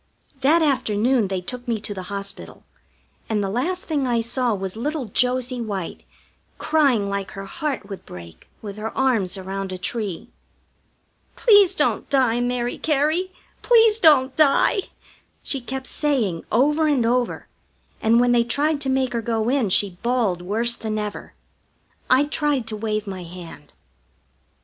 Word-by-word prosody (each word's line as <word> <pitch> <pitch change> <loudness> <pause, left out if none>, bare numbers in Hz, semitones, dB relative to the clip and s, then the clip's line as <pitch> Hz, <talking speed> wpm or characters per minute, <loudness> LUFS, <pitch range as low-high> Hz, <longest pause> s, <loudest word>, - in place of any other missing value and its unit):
That 315 +5 +4
afternoon 245 -4 +1
they 190 -1 -3
took 245 +6 -7
me 230 -2 0
to 210 - -4
the 190 - -6
hospital, 200 0 -5 0.7
and 210 -2 0
the 195 - -2
last 350 - -1
thing 290 -5 -1
I 240 -1 +1
saw 240 +2 0
was 190 0 -5
little 290 +4 -3
Josie 250 +3 0
White 200 -6 -5 0.5
crying 275 -10 +2
like 200 -1 -3
her 195 0 -7
heart 290 - -4
would 195 -2 -8
break 85 -2 -12 0.2
with 205 -1 -7
her 220 +1 -5
arms 225 -9 +1
around 190 0 -5
a 185 - -4
tree. 200 -2 -4 1.0
"Please 410 -6 +5
don't - - 0
die, 255 -4 +2
Mary 245 0 -2
Cary, 315 +5 +1 0.3
please 455 -2 +5
don't 275 -7 +5
die!" 310 +6 +4 0.6
she 275 - -2
kept 265 +2 -5
saying 245 - -1
over 295 +7 +3
and 275 -6 +2
over, 245 +1 0 0.5
and 230 +1 +4
when 245 0 +3
they 240 -1 +4
tried 285 +5 0
to 270 - -1
make 260 -1 0
her 235 - -1
go 225 0 -1
in 255 -6 +1
she 185 -1 +1
bawled 235 -8 0
worse 225 +6 0
than 220 -2 -4
ever. 210 -1 -5 0.7
I 260 +3 +5
tried 295 -4 0
to 215 - -3
wave 215 0 -2
my 190 -2 -6
hand. 170 -4 -11
240 Hz, 155 wpm, -22 LUFS, 205-275 Hz, 1.0 s, Please